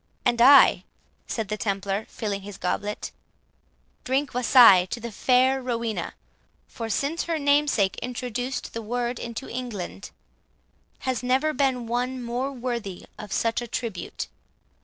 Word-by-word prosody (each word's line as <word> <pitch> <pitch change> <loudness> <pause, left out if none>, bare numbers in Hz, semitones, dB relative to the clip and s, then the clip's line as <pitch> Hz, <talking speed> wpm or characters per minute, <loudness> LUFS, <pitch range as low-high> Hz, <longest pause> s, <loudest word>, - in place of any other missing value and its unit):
"And 235 -1 +2
I," 275 +3 +7 0.4
said 220 -3 -3
the 215 - -2
Templar, 200 0 -2
filling 200 -3 -4
his 200 0 -9
goblet, 205 +3 -3 0.9
"drink 270 +2 -1
wassail 235 -7 +7
to 235 - -5
the 235 0 -6
fair 260 +4 +3
Rowena; 235 -3 -3 0.5
for 230 -1 -6
since 285 - -1
her 335 -1 -1
namesake 285 -9 +2
introduced 250 +1 -4
the 230 - -4
word 240 +2 -2
into 235 +2 -6
England, 230 -6 -6 0.9
has 260 -2 -1
never 260 +5 +1
been 260 -3 0
one 250 +2 -2
more 245 +3 -2
worthy 235 -7 -5
of 210 -2 -8
such 230 +1 0
a 240 - -6
tribute. 225 -5 -4
240 Hz, 135 wpm, -25 LUFS, 215-260 Hz, 0.9 s, I